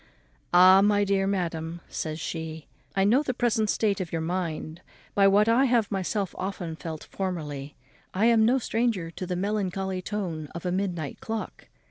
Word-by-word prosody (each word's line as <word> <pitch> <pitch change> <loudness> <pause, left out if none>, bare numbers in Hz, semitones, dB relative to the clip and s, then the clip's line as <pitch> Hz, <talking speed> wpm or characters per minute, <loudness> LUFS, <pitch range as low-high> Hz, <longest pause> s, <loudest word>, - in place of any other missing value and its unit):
"Ah, 185 +2 +8
my 205 0 +3
dear 195 -1 +1
madam," 170 -3 -2
says 155 0 -4
she, 160 -1 -5 0.3
"I 195 - +3
know 230 +8 +4
the 255 -5 -2
present 220 -3 +1
state 205 -3 +1
of 175 - -5
your 165 - -1
mind, 165 -1 -3 0.3
by 200 -1 +5
what 205 +2 +4
I 235 +4 +4
have 235 -5 +2
myself 195 0 -1
often 185 -3 -4
felt 160 -1 -7
formerly. 150 -7 -5 0.4
I 200 +4 +1
am 230 -1 +5
no 245 +4 +4
stranger 225 -8 -1
to 180 +2 -6
the 180 - -2
melancholy 190 -1 -2
tone 175 -6 -4
of 170 - -6
a 180 - 0
midnight 180 -6 -2
clock. 225 -1 -5
190 Hz, 170 wpm, -27 LUFS, 165-210 Hz, 0.4 s, Ah